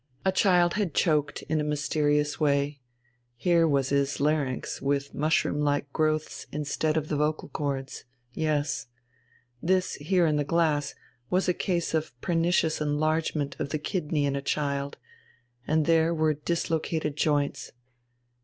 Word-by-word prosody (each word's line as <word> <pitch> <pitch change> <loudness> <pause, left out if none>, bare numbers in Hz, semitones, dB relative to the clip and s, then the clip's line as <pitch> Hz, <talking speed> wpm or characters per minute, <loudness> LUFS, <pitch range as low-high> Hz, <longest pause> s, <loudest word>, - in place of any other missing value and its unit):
A 190 - +4
child 180 -3 +3
had 200 -7 -1
choked 150 -3 +1
in 155 -1 0
a - - -1
mysterious 150 0 0
way: 140 -1 +1 0.5
here 170 +4 +3
was 140 -3 +1
his 140 0 +1
larynx 145 -3 -1
with 140 0 -1
mushroom 150 -1 +1
like 145 -1 0
growths 155 -1 -1
instead 150 +1 -1
of 155 -1 -1
the 155 - -1
vocal 150 +1 -1
chords. 140 -2 -4 0.3
Yes. 150 -2 -1 0.7
This, 185 +2 +1
here 175 +4 +2
in 155 -2 +2
the 145 - +1
glass, 145 -2 +1 0.3
was 185 +1 +1
a 180 - +3
case 175 -3 -1
of 155 -6 -2
pernicious 165 0 +1
enlargement 150 0 0
of 140 - -2
the 155 - -1
kidney 150 -2 -1
in 140 -1 0
a 140 - -2
child, 140 -1 -2 0.7
and 155 0 +2
there 165 0 +3
were 155 -1 +2
dislocated 160 -1 -2
joints. 145 -2 0
150 Hz, 145 wpm, -27 LUFS, 145-160 Hz, 0.7 s, A